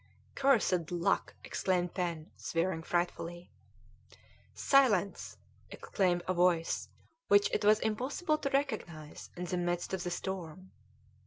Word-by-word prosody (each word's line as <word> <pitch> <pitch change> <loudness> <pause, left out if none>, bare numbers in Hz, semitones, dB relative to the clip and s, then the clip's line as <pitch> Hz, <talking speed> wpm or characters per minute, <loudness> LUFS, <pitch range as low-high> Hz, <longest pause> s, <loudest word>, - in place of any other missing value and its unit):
"Cursed 215 - +2
luck!" 175 -1 0
exclaimed 180 -2 -1
Pen, 170 -4 -3
swearing 165 0 -1
frightfully. 175 0 -3 1.0
"Silence!" 225 -9 +2 0.3
exclaimed 180 -3 0
a 185 - +1
voice 175 -2 +1 0.4
which 205 0 +5
it - - 0
was 210 +1 +5
impossible 275 +9 -1
to 280 - -2
recognise 175 - -3
in 180 - -4
the 180 +1 -2
midst 175 +1 -2
of 185 -2 -2
the 175 - -2
storm. 185 0 -5
180 Hz, 115 wpm, -32 LUFS, 175-210 Hz, 1.0 s, which